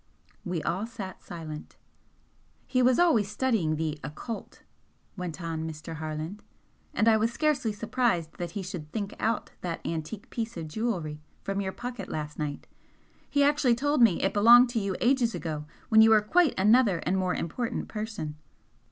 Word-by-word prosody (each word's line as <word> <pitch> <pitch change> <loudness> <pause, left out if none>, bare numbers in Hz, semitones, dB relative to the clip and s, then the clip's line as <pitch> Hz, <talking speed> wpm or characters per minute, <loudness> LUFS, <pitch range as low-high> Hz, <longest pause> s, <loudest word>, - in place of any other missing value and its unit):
We 175 -4 -3
all 190 +8 -1
sat 200 -5 -8
silent. 155 -3 -8 0.9
"He 255 - +1
was 250 0 +4
always 235 - +4
studying 210 -9 +1
the 155 -1 -2
'occult'" 220 +10 -7 0.5
went 180 -4 -5
on 160 -2 -3
Mr. 160 +1 -7
Harland 155 +5 -5 0.5
"And 220 - +1
I 220 -1 +6
was 225 +2 +1
scarcely 285 -4 +1
surprised 210 -6 -1
that 175 -1 -4
he 195 - -3
should 175 -5 -7
'think 200 0 -3
out' 225 +1 -1
that 170 -2 -3
antique 165 +6 -5
piece 230 -3 -4
of 160 -2 -5
jewellery 165 -7 -2 0.2
from 195 0 -1
your 190 -1 -2
pocket 245 +3 -6
last 150 -1 -5
night. 145 -2 -3 0.6
He 285 0 +3
actually 285 -4 +4
told 290 +2 +1
me 225 -7 +5
it 195 - +1
belonged 235 +4 +8
to 235 - 0
you 195 -2 -2
ages 240 -2 +2
ago, 155 -3 -4 0.2
when 220 -1 +7
you 220 - +7
were 220 -1 +6
quite 310 +8 +3
another 210 -1 +5
and 185 - +1
more 185 -1 0
important 230 +9 -3
person!" 210 -9 -5
200 Hz, 170 wpm, -28 LUFS, 165-235 Hz, 0.9 s, belonged